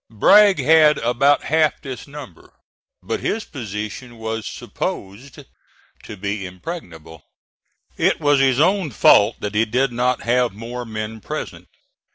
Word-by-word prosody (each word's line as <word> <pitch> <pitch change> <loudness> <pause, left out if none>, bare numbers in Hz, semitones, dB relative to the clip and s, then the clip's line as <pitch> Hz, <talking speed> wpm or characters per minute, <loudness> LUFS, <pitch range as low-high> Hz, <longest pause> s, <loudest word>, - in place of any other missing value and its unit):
Bragg 195 - +5
had 155 -1 +5
about 130 +4 +2
half 155 0 +1
this 130 -2 -8
number, 140 - -12 0.5
but - - -3
his 220 +1 -3
position 110 0 -7
was 110 0 -5
supposed 105 +8 -6 0.6
to 105 - -9
be 100 +1 -4
impregnable. 90 - -9 0.8
It - - +1
was 145 -1 +3
his 135 -1 +2
own 185 +1 +2
fault 105 -2 +4
that 105 0 -4
he 110 +2 +2
did 125 +4 0
not 125 +1 -1
have 125 -1 +1
more 120 +4 -7
men 110 0 -6
present. - - -7
120 Hz, 135 wpm, -20 LUFS, 105-145 Hz, 0.8 s, Bragg